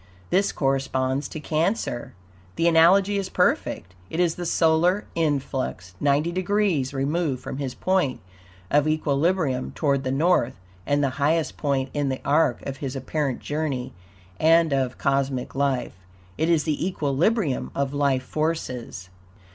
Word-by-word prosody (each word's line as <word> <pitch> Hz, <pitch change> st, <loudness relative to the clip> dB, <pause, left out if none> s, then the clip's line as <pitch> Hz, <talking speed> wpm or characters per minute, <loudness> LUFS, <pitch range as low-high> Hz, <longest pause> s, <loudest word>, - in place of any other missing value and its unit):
This 195 Hz, +2 st, +3 dB
corresponds 135 Hz, 0 st, 0 dB
to 155 Hz, -, -7 dB
Cancer. 155 Hz, -, -1 dB, 0.4 s
The 165 Hz, -, +2 dB
analogy 190 Hz, +5 st, +5 dB
is 190 Hz, -1 st, -4 dB
perfect. 90 Hz, -, 0 dB, 0.2 s
It 160 Hz, -, -4 dB
is 175 Hz, -2 st, +3 dB
the 175 Hz, 0 st, -5 dB
solar 165 Hz, +5 st, +2 dB
influx, 135 Hz, -, -2 dB
ninety 145 Hz, +4 st, +2 dB
degrees 185 Hz, -6 st, 0 dB
removed 140 Hz, 0 st, -1 dB
from -, -, -5 dB
his 135 Hz, -3 st, -4 dB
point 185 Hz, -9 st, 0 dB, 0.5 s
of 145 Hz, +1 st, +3 dB
equilibrium 155 Hz, -2 st, 0 dB
toward 140 Hz, -3 st, +1 dB
the 130 Hz, -, -2 dB
North, 135 Hz, -, +2 dB, 0.3 s
and 145 Hz, 0 st, +2 dB
the 140 Hz, +1 st, -2 dB
highest 160 Hz, +2 st, +1 dB
point 135 Hz, -2 st, -1 dB
in 145 Hz, -2 st, 0 dB
the 130 Hz, -, -2 dB
arc 145 Hz, -3 st, +2 dB
of 135 Hz, -1 st, -5 dB
his 135 Hz, -1 st, -5 dB
apparent 135 Hz, 0 st, -2 dB
journey 145 Hz, -4 st, -3 dB, 0.5 s
and 165 Hz, -1 st, +4 dB
of 130 Hz, -2 st, 0 dB
cosmic 135 Hz, -2 st, -1 dB
life. 135 Hz, -7 st, -1 dB, 0.4 s
It 160 Hz, +2 st, 0 dB
is 165 Hz, -3 st, +3 dB
the 155 Hz, -2 st, -1 dB
equilibrium 165 Hz, -, 0 dB
of 140 Hz, 0 st, -1 dB
life 140 Hz, -3 st, +1 dB
forces. 125 Hz, -, -3 dB
145 Hz, 140 wpm, -24 LUFS, 135-165 Hz, 0.5 s, analogy